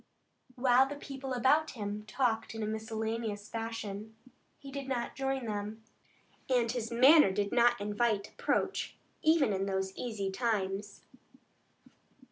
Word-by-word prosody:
While 255 +1 +4
the 290 - -5
people 270 -2 -7
about 290 +6 +3
him 210 0 -4
talked 225 -2 0
in 225 - -3
a - - 0
miscellaneous 220 -1 -3
fashion, 220 -2 -5 0.4
he 275 -1 -11
did 275 -1 -5
not 245 -3 -2
join 270 -2 -1
them, 210 +1 -4 0.7
and 240 -3 +2
his 235 -2 -3
manner 265 +2 +7
did 200 +1 -1
not 240 0 +4
invite 210 0 0
approach - - -1 0.3
even 310 -8 +4
in 195 0 -1
those 190 0 -1
easy 210 -5 -3
times. 200 -2 -2
225 Hz, 130 wpm, -32 LUFS, 210-255 Hz, 0.7 s, manner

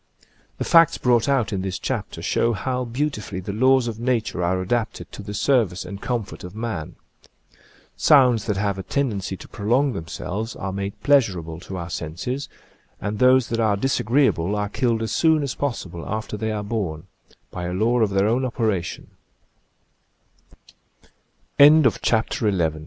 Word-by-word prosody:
The - - -2
facts 165 -2 +5
brought 120 +1 +2
out 120 -7 +1
in 95 - -1
this 95 -1 -3
chapter - - -4
show 115 - +1
how 125 +4 -2
beautifully 115 - -3
the 95 +2 -5
laws 130 +2 +3
of 115 -1 -5
nature 120 -7 -1
are 90 +2 +1
adapted 110 +5 -2
to - - -8
the 105 0 -7
service 110 -9 +1
and 100 +2 -8
comfort 120 -5 -4
of 90 +2 -9
man. 110 -9 -4 1.0
Sounds 125 -7 +4
that 105 -3 0
have 100 -1 -1
a - - -2
tendency 100 -6 -2
to - - -12
prolong 125 +6 +1
themselves 100 +5 -5
are 95 -1 -4
made 100 0 -4
pleasurable 95 - +2
to 95 +1 -7
our 85 -1 -6
senses, 90 - -4 0.5
and 105 0 -4
those 130 -1 +5
that 115 - -1
are 110 -3 +2
disagreeable 115 - +1
are 105 -1 -2
killed 115 -1 0
as 110 - -3
soon 160 -2 +3
as 140 - -2
possible 95 -11 -4
after 110 0 -4
110 Hz, 130 wpm, -23 LUFS, 95-125 Hz, 1.0 s, facts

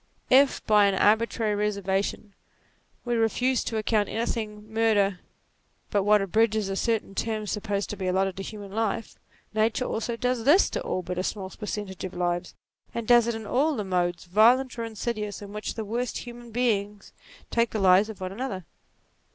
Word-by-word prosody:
If, 270 +2 +5
by 210 -2 +5
an 195 - +1
arbitrary 220 +1 +2
reservation, 200 0 -1 0.7
we 240 - -1
refuse 240 +2 +1
to 225 - -2
account 215 -1 +1
anything 215 -2 -3
murder 205 -4 +2 0.7
but 205 - +2
what 205 0 +4
abridges 215 +1 +1
a 195 - -2
certain 225 -1 -1
term 215 +1 -2
supposed 205 -1 -2
to - - -4
be 190 -2 -4
allotted 190 0 +1
to - - -4
human 205 0 -8
life, 220 +1 -2 0.3
nature 220 +3 +1
also 230 +1 -2
does 250 -1 -1
this 305 - +5
to - - -2
all 185 - -2
but 180 +1 -4
a - - -1
small 190 -1 -4
percentage 205 -3 -5
of 185 - -5
lives, 175 0 -2 0.4
and 235 -2 -3
does 240 -1 +6
it 235 - -1
in 220 -1 -6
all 285 +8 +1
the 215 - -2
modes, 175 -2 0
violent 235 +7 +4
or - - -1
insidious, 215 -1 -4
in 205 0 -10
which 210 0 -4
the 220 - -4
worst 240 +4 -2
human 240 -1 -9
beings 210 -4 -1 0.4
take 235 0 +2
the - - -3
lives 195 +1 +5
of 220 - -8
one 185 0 -3
another. 195 -5 -5
215 Hz, 180 wpm, -26 LUFS, 195-230 Hz, 0.7 s, does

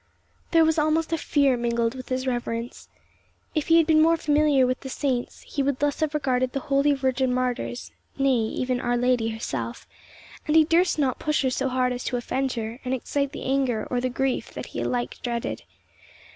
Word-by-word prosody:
There 330 -1 +5
was 320 0 +2
almost 310 +2 +1
a - - +2
fear 280 -4 +2
mingled 235 -1 0
with 255 -1 -9
his 255 0 -1
reverence. 240 -1 -4 0.6
If 310 -3 -1
he 330 - +6
had 330 - +5
been 310 0 +4
more 330 +1 +4
familiar 295 -3 +3
with 255 0 -1
the 265 - -8
saints, 260 -3 -2
he 285 - -4
would 275 -1 0
thus 290 0 0
have 310 -1 -1
regarded 255 -3 0
the 275 - -1
holy 280 +2 +2
virgin 260 -1 0
martyrs, 250 -1 -2 0.3
nay, 275 -1 +3
even 250 +2 -1
Our 245 0 0
Lady 245 -2 +2
herself; 135 - -5 0.6
and 300 - +1
he 320 - +8
durst 340 +3 +2
not 270 -4 0
push 300 -1 0
her 260 - +1
so 265 +1 -1
hard 250 0 +1
as 245 - -5
to 250 - -1
offend 260 +2 -2
her, 230 +1 -5
and 255 0 -1
excite 280 +2 -2
the - - -7
anger 260 -5 0
or 245 -1 0
the 255 - 0
grief 265 +1 -1
that - - -5
he - - -3
alike 245 -1 -2
dreaded. 235 - -3
260 Hz, 200 wpm, -25 LUFS, 245-290 Hz, 0.6 s, he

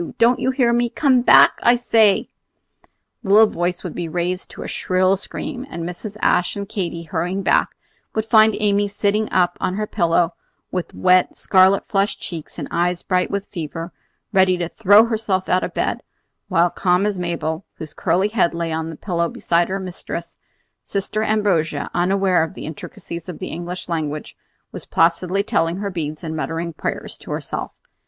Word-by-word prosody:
Don't 235 +2 +4
you - - 0
hear 255 -3 +2
me? 240 0 +1
Come 260 -1 +3
back, - - +6
I 240 - +5
say!" 225 -4 +3 0.9
The 195 - -7
little 215 +2 +8
voice 175 +1 -2
would 175 - -5
be 175 -2 -4
raised 180 +2 -2
to - - -8
a - - -6
shrill 185 +1 +1
scream; 245 +5 -6
and 170 - -6
Mrs. 185 +5 -6
Ashe 180 - +2
and 200 -1 -5
Katy, 175 -5 -4
hurrying 180 +3 -2
back, - - +2 0.4
would 220 -1 0
find 220 -1 +5
Amy 205 -1 +2
sitting 205 +1 0
up 180 -1 +1
on 185 - -1
her 215 +1 -1
pillow 170 -4 +1 0.4
with 180 -2 -4
wet, 185 0 +3
scarlet 190 +1 +4
flushed 195 0 0
cheeks 165 -4 -7
and - - -5
eyes 175 +1 0
bright 180 -1 0
with 200 0 -3
fever, 165 0 -6 0.4
ready 185 -2 +4
to 175 -1 -2
throw 205 +4 +5
herself 215 -5 -1
out 185 - +2
of - - -5
bed; - - -1 0.5
while, 170 +1 +2
calm 180 +2 +1
as 205 -3 -1
Mabel, 165 -1 -3
whose 155 -3 -8
curly 185 +4 +1
head 195 -6 +1
lay 170 -1 -2
on 160 0 -2
the 165 - -7
pillow 170 -1 -1
beside 170 0 +1
her 190 - -1
little 190 -1 -4
mistress, 170 -1 -6 0.5
Sister 200 +2 -2
Ambrogia, 205 -7 0
unaware 185 -1 +2
of 160 - -6
the - - -7
intricacies 170 +2 -8
of 175 - -6
the - - -6
English 175 +2 -6
language, 155 -3 -4 0.4
was - - -7
placidly 180 +4 +2
telling 165 -1 0
her 200 0 -3
beads 155 -3 -4
and 160 -1 -4
muttering 165 +2 -3
prayers - - -5
to - - -13
herself. - - -4
185 Hz, 180 wpm, -20 LUFS, 170-205 Hz, 0.9 s, little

